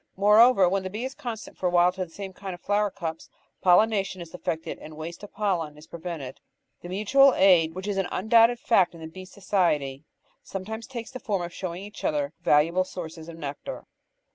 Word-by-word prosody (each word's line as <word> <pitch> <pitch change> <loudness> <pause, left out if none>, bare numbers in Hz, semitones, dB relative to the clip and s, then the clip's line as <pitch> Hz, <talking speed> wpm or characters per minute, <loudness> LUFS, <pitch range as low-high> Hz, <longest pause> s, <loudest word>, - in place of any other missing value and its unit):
Moreover, 210 +1 +6
when 195 +2 +1
the 190 - -5
bee 215 +6 -4
is 265 - -5
constant 235 -6 -7
for 185 - +1
a - - +3
while 175 0 +4
to 185 +1 -4
the 180 - -9
same 195 +1 -7
kind 190 -1 -6
of 175 - -17
flower 205 +1 +1
cups, 165 -4 -6 0.3
pollination 195 0 +3
is 170 -2 -9
effected 165 -2 -4
and 155 0 -11
waste 165 +2 -7
of 205 - -10
pollen 175 -8 -1
is 150 - -13
prevented. 160 -6 -7 0.4
The 175 - -9
mutual 255 +8 +4
aid 175 -4 +5
which 185 +2 -5
is 205 -2 -1
an 190 -2 0
imdoubted 230 +4 +4
fact 190 -7 +2
in 165 - -12
the - - -6
bee 185 +3 -10
society 170 -8 0 0.4
sometimes 220 +4 -6
takes 235 -3 -7
the 255 - -7
form 200 -7 -2
of 175 0 -6
showing 180 0 -5
each 205 +1 -10
other 145 0 0
val 150 0 +5
uable 175 +4 0
sources 165 -2 -8
of 165 - -9
nectar. 145 - -6
185 Hz, 210 wpm, -26 LUFS, 165-205 Hz, 0.4 s, Moreover